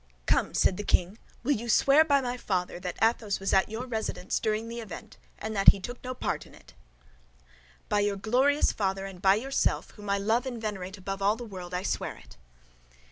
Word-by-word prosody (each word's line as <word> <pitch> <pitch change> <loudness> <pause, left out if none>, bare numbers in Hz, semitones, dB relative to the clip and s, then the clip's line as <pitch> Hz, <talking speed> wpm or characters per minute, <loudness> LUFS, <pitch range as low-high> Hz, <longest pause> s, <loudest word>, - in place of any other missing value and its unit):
"Come," - - +1
said 185 - +3
the 210 - -4
king, 185 +2 +1 0.2
"will 275 - +1
you 235 -3 -1
swear, 275 +7 +6
by 285 -3 +3
my 245 -1 -2
father, 180 -7 -2
that 180 -1 -5
Athos 225 -3 +1
was 195 - -1
at 190 +2 +4
your 225 +3 -4
residence 220 -6 -2
during 215 +1 -1
the 235 +1 -6
event 215 -7 -9 0.2
and 220 0 -5
that 195 - -1
he 200 - +4
took 245 +6 -7
no 255 0 -4
part - - -3
in - - -16
it?" - - -18 1.1
"By 210 - +1
your 205 0 +1
glorious 260 +8 +2
father, 195 -1 -2
and 190 -2 -9
by 195 0 +5
yourself, 270 +6 0
whom 210 -1 -10
I 200 - +2
love 225 +6 +1
and 245 -3 -4
venerate 200 -3 -5
above 195 +1 -5
all 205 +2 +3
the 240 - -8
world, 185 -4 -7
I 180 - -2
swear - - -2
it." - - -16
210 Hz, 210 wpm, -28 LUFS, 195-240 Hz, 1.1 s, swear